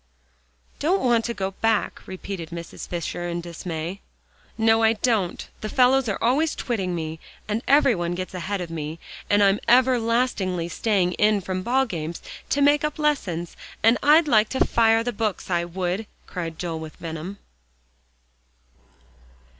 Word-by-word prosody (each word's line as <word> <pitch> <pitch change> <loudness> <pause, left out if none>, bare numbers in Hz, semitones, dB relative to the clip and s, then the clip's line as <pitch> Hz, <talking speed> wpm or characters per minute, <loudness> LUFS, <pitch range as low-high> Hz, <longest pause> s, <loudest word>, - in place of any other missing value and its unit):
"Don't 355 +4 +1
want 235 -3 +3
to 235 - -2
go 195 -1 -2
back?" 220 +2 0
repeated 185 -3 -6
Mrs. 170 0 -8
Fisher 175 0 -4
in 170 0 -2
dismay. 170 +1 -5 0.6
"No, 225 0 +4
I 225 0 +5
don't. 215 -5 0
The 215 - -4
fellows 255 0 +4
are 200 - -1
always 285 +7 +2
twitting 190 -7 -2
me, 160 -1 -4 0.3
and 210 +2 -1
every 275 -2 +5
one 175 -2 -2
gets 185 +1 -5
ahead 190 +2 -3
of 170 -2 -6
me, 155 0 -5 0.3
and 205 0 +4
I'm 195 +1 +4
everlastingly 230 -8 +2
staying 190 -1 +1
in 210 0 +4
from 185 0 -3
ballgames 190 -11 -1 0.3
to 285 - +2
make 290 +1 +4
up 300 +1 -1
lessons, 200 - -1 0.3
and 225 +2 +5
I'd 305 +2 +5
like 215 -5 +4
to 265 - +1
fire 225 -1 +3
the 245 +1 -2
books, 210 -3 -2
I 170 -1 +1
would," 185 +4 -3 0.2
cried 165 -3 -5
Joel 165 -2 -3
with 160 -1 -8
venom. 165 +4 -6
200 Hz, 155 wpm, -24 LUFS, 175-235 Hz, 0.6 s, I